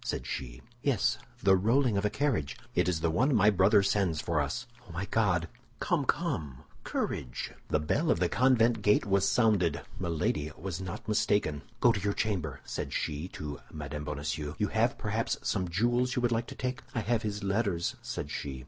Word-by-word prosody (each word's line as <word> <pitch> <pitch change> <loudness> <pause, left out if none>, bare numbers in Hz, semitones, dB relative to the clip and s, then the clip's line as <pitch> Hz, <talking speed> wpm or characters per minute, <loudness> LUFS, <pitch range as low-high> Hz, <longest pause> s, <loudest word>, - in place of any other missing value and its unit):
said - - -3
she. - - -5 0.2
"Yes, 135 -7 +1 0.2
the 95 0 +6
rolling 115 +5 +3
of 100 - +1
a 105 - +2
carriage." 115 - -1 0.2
"It - - +2
is 80 -3 -1
the 85 - +2
one 130 - +3
my 105 0 +6
brother 100 +2 +5
sends 95 -5 +1
for 85 -2 0
us." 75 - -3 0.2
"Oh, - - -11
my 85 +3 -3
God!" 95 -6 +1 0.3
"Come, - - +1
come! 70 -5 -1 0.2
courage!" 60 - -3 0.2
The 75 - +1
bell 140 - 0
of 85 - +3
the 90 - +3
convent 120 -1 +3
gate 105 +1 +4
was 100 -1 +3
sounded; 100 -10 +3 0.2
Milady 80 -3 -1
was 95 0 -4
not 90 +3 -6
mistaken. 105 -8 +1 0.2
"Go 120 - +7
to 110 - -1
your 100 +1 0
chamber," 90 -12 -2
said - - -4
she 75 +3 -2
to 75 -5 -6
Mme. 75 -1 -5
Bonacieux; 75 +1 -3
"you - - 0
have - - +1
perhaps - - -1
some 90 -1 0
jewels 120 +6 +1
you 125 - +1
would 120 - +2
like 115 0 0
to - - -8
take." 125 0 -3
"I 115 - +1
have 110 +1 +1
his 105 -2 -3
letters," 100 -4 0
said - - -5
she. 65 -2 -4
95 Hz, 195 wpm, -30 LUFS, 80-115 Hz, 0.3 s, Go